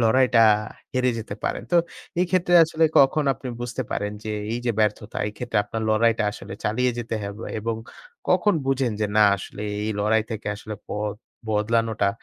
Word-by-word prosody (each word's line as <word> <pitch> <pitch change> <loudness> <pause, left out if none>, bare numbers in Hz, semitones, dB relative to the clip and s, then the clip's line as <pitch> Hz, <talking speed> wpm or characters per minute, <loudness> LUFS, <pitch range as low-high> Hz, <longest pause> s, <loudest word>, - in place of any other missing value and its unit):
লড়াইটা 125 +1 +4 0.5
হেরে 125 -1 +2
যেতে 105 -2 -6
পারেন। - - -1
তো 175 - +6 0.4
এই 180 - +3
ক্ষেত্রে 175 -1 +2
আসলে 160 0 +1
কখন 140 +2 +4
আপনি 130 +2 -8
বুঝতে 120 +2 -3
পারেন 105 0 -2
যে, 110 - -3 0.2
এইযে 120 0 -1
ব্যর্থতা 105 0 0
এই - - -8
ক্ষেত্রে 120 -3 -1
আপনার 115 0 -4
লড়াইটা 115 +1 +3
আসলে - - -9
চালিয়ে 125 +4 +1
যেতে 115 -1 -3
হবে? 100 +2 -6
এবং 115 +1 -2 0.5
কখন 210 -3 +3
বুঝেন 135 -3 +1
যে 105 - +2
না 110 - +7
আসলে 100 - -9 0.2
এই 110 - -1
লড়াই 110 +2 +3
থেকে 110 -1 -5
আসলে 105 +1 -7
পথ 105 0 -2 0.3
বদলানোটা 110 -1 +1
115 Hz, 170 wpm, -24 LUFS, 105-125 Hz, 0.5 s, না